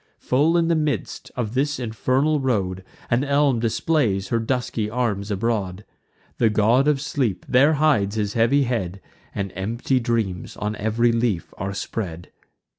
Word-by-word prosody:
Full 150 +7 +2
in 165 -1 +2
the 170 - +3
midst 155 -2 -2
of 120 -3 -3
this 145 +3 0
infernal 130 +6 +1
road, 95 -8 -1 0.3
An 120 +3 +3
elm 140 -3 +2
displays 115 -4 0
her 115 - +1
dusky 115 -2 -2
arms 105 -4 -1
abroad: 100 -2 -2 0.5
The 115 - +4
God 115 +6 +3
of 150 -2 +3
Sleep 135 -9 -2
there 140 +5 +5
hides 125 -10 +2
his 105 -1 -1
heavy 120 +5 +3
head, 100 -7 -2 0.4
And 100 -2 -3
empty 115 +7 0
dreams 115 -7 -2
on 105 +1 -2
ev'ry 115 +3 +2
leaf 115 -6 -1
are 95 +1 -4
spread. 90 -6 -5
115 Hz, 150 wpm, -23 LUFS, 105-135 Hz, 0.5 s, there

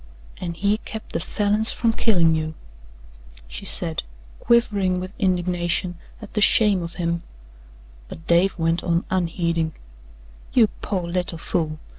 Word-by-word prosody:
"An' 170 -2 -5
he 205 +4 +1
kept 220 -1 -9
the - - 0
Falins 210 +2 +2
from 230 -1 0
killin' 175 -9 +3
you," 155 0 -2 0.9
she - - -8
said, - - +4 0.4
quivering 200 -6 +2
with 185 +1 -7
indignation 175 -1 0 0.3
at 210 - -11
the 210 - 0
shame 205 -3 +4
of 170 0 -7
him, 170 -1 -2 0.9
but 160 - -11
Dave 175 +3 +3
went 165 0 0
on 170 0 0
unheeding: 170 -3 0 0.8
"You 230 -4 +5
pore 185 -4 -2
little 175 -1 -2
fool! 160 -2 -2
180 Hz, 135 wpm, -23 LUFS, 170-205 Hz, 0.9 s, You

